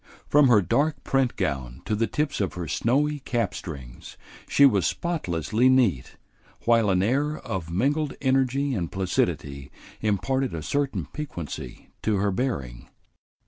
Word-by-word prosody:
From 145 -1 +5
her 110 -5 +5
dark 150 - 0
print 135 -2 +1
gown 65 -3 -3
to 105 - 0
the 115 +2 +1
tips 150 -6 -1
of 95 -4 -2
her 90 -2 -4
snowy 145 - +1
cap 115 -8 -1
strings 65 -11 -9 0.3
she 140 - +6
was 100 -10 +4
spotlessly 120 - 0
neat, 115 - +2 0.5
while 115 -3 +4
an 95 -1 +2
air 145 +7 +1
of 85 -4 -5
mingled 140 - 0
energy 135 +1 +1
and 90 -8 -2
placidity 70 -7 -1 0.3
imparted 125 +3 0
a 80 - -5
certain 140 - -1
piquancy 85 - -7
to 110 - +1
her 100 +1 +1
bearing. 70 - -3
110 Hz, 145 wpm, -25 LUFS, 85-135 Hz, 0.5 s, she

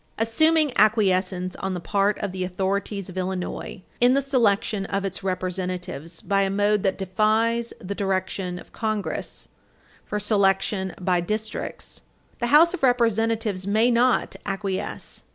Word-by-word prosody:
Assuming 300 +6 +3
acquiescence 190 -4 +2
on 190 -1 -3
the - - -3
part 200 +3 +1
of 200 - -2
the 185 0 -3
authorities 195 +2 -2
of 185 - -9
Illinois 185 0 -4 0.2
in 245 +2 +5
the 275 - +3
selection 220 -6 +1
of 195 0 -2
its 195 -1 -4
Representatives 180 -3 -4
by 200 -1 +2
a 195 - +1
mode 205 +1 +2
that 190 0 0
defies 220 +4 +1
the 200 +1 -5
direction 190 -2 -2
of - - -13
Congress 215 -2 -3 0.6
for 210 - -3
selection 195 -2 +1
by 180 -1 +1
districts, 215 +5 -5 0.4
the 240 - 0
House 315 +7 +6
of 370 - -4
Representatives 225 -5 +1
may 220 +4 +3
not 240 +1 +2
acquiesce. 195 0 -4
200 Hz, 140 wpm, -24 LUFS, 185-225 Hz, 0.6 s, House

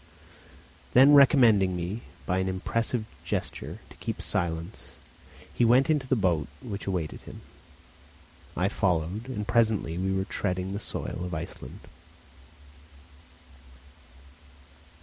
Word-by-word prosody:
Then 135 +4 +7
recommending 120 -10 +6
me, 90 +6 -4 0.2
by 90 0 0
an 95 - -1
impressive 110 +5 -1 0.2
gesture, - - -4
to - - -13
keep - - -5
silence, 85 +2 -1 0.6
he - - +1
went 125 +5 +5
into 145 -4 0
the 130 - +2
boat 90 - +1
which 105 -6 -7
awaited 90 -5 -3
him. - - -11 1.2
I 90 - +2
followed, 95 +4 -1
and 105 -5 -4
presently 110 -8 +1
we 95 +1 0
were 95 0 0
treading 95 -1 -3
the 100 - -3
soil 90 - -5
of 90 -2 -4
Iceland. 80 +2 -7
100 Hz, 115 wpm, -27 LUFS, 90-115 Hz, 1.2 s, Then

